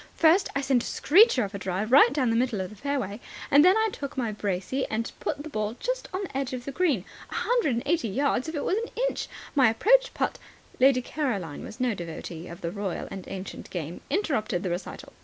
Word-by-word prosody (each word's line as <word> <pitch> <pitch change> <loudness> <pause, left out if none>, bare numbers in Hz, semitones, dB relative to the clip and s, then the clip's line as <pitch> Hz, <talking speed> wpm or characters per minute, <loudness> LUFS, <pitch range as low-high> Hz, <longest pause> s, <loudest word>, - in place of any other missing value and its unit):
"First, 330 +4 +4
I 280 - +1
sent 265 -3 +2
a - - -6
screecher 360 - +5
of 200 - -5
a 200 - -4
drive 190 +4 -2
right 260 -2 +8
down 260 -4 +1
the - - +1
middle 240 -3 +1
of 185 +1 -4
the - - -11
fairway. 240 -4 -3 0.3
Then 290 +5 +7
I 440 0 +2
took 280 -6 -6
my 235 -4 0
brassey 205 +5 -2
and 225 +1 -2
put 290 -1 -3
the 310 - -7
ball 215 0 -2
just - - -2
on 375 +2 -3
the 355 - -8
edge 270 -1 -2
of 250 -1 -5
the 275 - -4
green. 280 - +1 0.2
A - - -7
hundred 470 - +1
and 235 - -2
eighty 325 -4 +1
yards 270 +5 0
if 320 - -5
it 290 - -2
was 390 - +1
an 460 - -5 0.2
inch. - - -3 0.3
My 265 -5 +5
approach - - +3
putt - - -1 0.2
" - - -27
Lady 255 -1 +5
Caroline, 210 - -3
who - - -8
was 235 - -11
no 250 -2 +1
devotee 170 -1 -7
of 170 +2 -10
the 170 - -3
royal 200 -2 -4
and 190 -2 -7
ancient 190 0 -7
game, 170 -1 -5
interrupted 275 - 0
the 185 - -1
recital. 175 +2 -6
255 Hz, 235 wpm, -27 LUFS, 200-295 Hz, 0.3 s, right